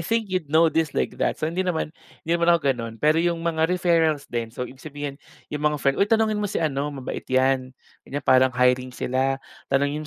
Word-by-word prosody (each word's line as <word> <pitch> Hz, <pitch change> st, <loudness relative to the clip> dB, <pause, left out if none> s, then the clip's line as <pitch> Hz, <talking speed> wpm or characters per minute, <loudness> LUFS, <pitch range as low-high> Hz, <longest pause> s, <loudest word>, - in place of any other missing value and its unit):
think 225 Hz, +1 st, -1 dB
you'd 180 Hz, -5 st, -1 dB
know 160 Hz, +2 st, +4 dB
this 160 Hz, -3 st, 0 dB
like -, -, -1 dB
that -, -, +1 dB
so, -, -, -3 dB
hindi 165 Hz, +4 st, -1 dB
naman 175 Hz, -4 st, -1 dB, 0.3 s
hindi 165 Hz, -, -1 dB
naman 170 Hz, 0 st, +1 dB
ako 170 Hz, -, +4 dB
ganun. 115 Hz, -2 st, -6 dB
Pero 155 Hz, +7 st, +3 dB
'yong 170 Hz, 0 st, +1 dB
mga 160 Hz, -1 st, +1 dB
referrals 165 Hz, -5 st, +2 dB
din, 115 Hz, -1 st, -2 dB
so 125 Hz, +2 st, -5 dB
ibig 130 Hz, +2 st, -12 dB
sabihin 145 Hz, -1 st, -6 dB, 0.3 s
yung 150 Hz, -, -3 dB
mga 150 Hz, 0 st, +2 dB
friend, 140 Hz, -1 st, +1 dB
"Hoy 200 Hz, -, +3 dB
tanungin 220 Hz, -1 st, +2 dB
mo 205 Hz, -, -1 dB
si -, -, -3 dB
ano 145 Hz, -3 st, 0 dB
mabait 135 Hz, -3 st, -6 dB
'yan, 130 Hz, 0 st, +2 dB, 0.4 s
ganyan 145 Hz, 0 st, -4 dB
parang 130 Hz, 0 st, +5 dB
hiring 125 Hz, 0 st, +2 dB
sila. 130 Hz, +1 st, 0 dB, 0.3 s
Tanungin 140 Hz, +2 st, +1 dB
150 Hz, 215 wpm, -24 LUFS, 130-170 Hz, 0.4 s, parang